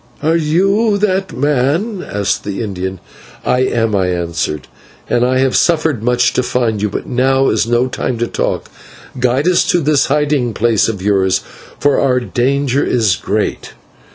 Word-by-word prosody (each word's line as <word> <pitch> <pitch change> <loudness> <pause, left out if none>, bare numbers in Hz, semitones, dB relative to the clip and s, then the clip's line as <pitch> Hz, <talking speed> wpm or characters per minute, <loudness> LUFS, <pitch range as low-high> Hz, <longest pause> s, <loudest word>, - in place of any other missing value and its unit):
"Are 160 +2 +2
you 195 +7 +2
that 195 -2 0
man?" 150 - 0
asked 100 -1 -2
the 100 +3 -4
Indian. 95 -2 -4 0.5
"I 125 - +2
am," 115 -4 0
I 95 -2 +1
answered, 85 -4 -3 0.4
"and 120 - +1
I 130 +1 +2
have 130 0 +1
suffered 160 -7 +2
much 125 +1 +2
to - - +1
find 120 -4 -1
you, 105 - 0
but - - -5
now 135 +2 +2
is - - +1
no 120 +1 +2
time 125 -1 -3
for 120 - 0
talk; - - -2 0.5
guide 125 +5 +1
us 180 -1 +4
to 175 - +3
this 150 -3 +2
hiding 145 -5 0
place 115 -2 +2
of 100 -4 -5
yours, 95 -2 +2 0.4
for 145 -1 +2
our 130 -2 +2
danger 135 +2 0
is 110 -6 +2
great." - - -3
125 Hz, 165 wpm, -15 LUFS, 110-150 Hz, 0.5 s, us